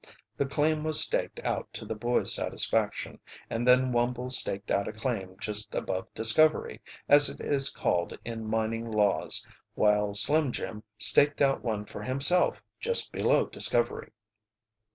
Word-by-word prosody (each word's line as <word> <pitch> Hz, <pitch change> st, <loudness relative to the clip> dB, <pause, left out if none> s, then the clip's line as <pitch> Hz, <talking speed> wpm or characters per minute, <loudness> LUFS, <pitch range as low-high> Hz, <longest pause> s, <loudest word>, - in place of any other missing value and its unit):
The 140 Hz, -, -2 dB
claim 150 Hz, +2 st, 0 dB
was 155 Hz, -1 st, +5 dB
staked -, -, 0 dB
out -, -, -4 dB
to -, -, -7 dB
the -, -, -4 dB
boys' 120 Hz, +3 st, +2 dB
satisfaction, -, -, -1 dB, 0.3 s
and 120 Hz, +2 st, -2 dB
then 125 Hz, 0 st, +4 dB
Wumble 125 Hz, +1 st, -1 dB
staked 100 Hz, -5 st, -2 dB
out 100 Hz, -, 0 dB
a -, -, -4 dB
claim 105 Hz, -5 st, -5 dB
just 105 Hz, 0 st, -3 dB
above 95 Hz, 0 st, -4 dB
Discovery, 155 Hz, +8 st, +2 dB, 0.3 s
as 145 Hz, 0 st, +6 dB
it -, -, -10 dB
is 140 Hz, -1 st, 0 dB
called 85 Hz, -1 st, -2 dB
in 115 Hz, -2 st, -6 dB
mining 110 Hz, +1 st, -2 dB
laws, 105 Hz, -2 st, +1 dB, 0.3 s
while 105 Hz, -1 st, +1 dB
Slim 150 Hz, +5 st, +4 dB
Jim 105 Hz, -2 st, -6 dB, 0.2 s
staked 145 Hz, +6 st, +4 dB
out 135 Hz, -1 st, +1 dB
one 110 Hz, -3 st, -4 dB
for -, -, -10 dB
himself 140 Hz, +8 st, +2 dB, 0.2 s
just 470 Hz, 0 st, +1 dB
below -, -, +1 dB
Discovery. 120 Hz, 0 st, -1 dB
120 Hz, 150 wpm, -27 LUFS, 105-140 Hz, 0.3 s, as